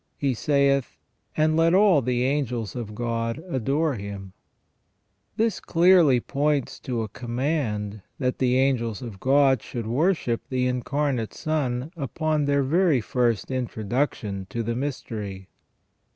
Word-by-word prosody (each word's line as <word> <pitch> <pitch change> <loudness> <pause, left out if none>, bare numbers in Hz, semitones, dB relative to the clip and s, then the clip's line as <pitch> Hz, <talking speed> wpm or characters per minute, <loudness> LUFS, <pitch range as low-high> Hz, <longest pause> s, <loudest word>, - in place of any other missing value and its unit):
He 140 -2 0
saith. 140 +1 +1 0.4
And 155 0 +3
let 165 +2 +4
all 195 -7 +5
the 125 0 0
angels 125 -5 -1
of 110 -4 -5
God 115 0 -2
adore 145 +1 0
Him 100 -3 -7 0.5
". - - -47
This 225 -3 +1
clearly 170 -6 +5
points 145 +1 -1
to 120 -3 -3
a - - -4
command 120 -3 -2 0.2
that 125 -2 -1
the 125 -1 +2
angels 130 -3 0
of 110 -5 -8
God 135 -1 +4
should 120 -3 -6
worship 125 - +1
the 130 -1 0
Incarnate 125 -1 -1
Son 145 -3 -2
upon 155 +1 -1
their 140 0 +2
very 160 0 +3
first 120 0 0
introduction 110 -4 -2
to 115 - -3
the 115 +1 -2
mystery. 110 -8 -5
130 Hz, 135 wpm, -25 LUFS, 115-145 Hz, 0.5 s, all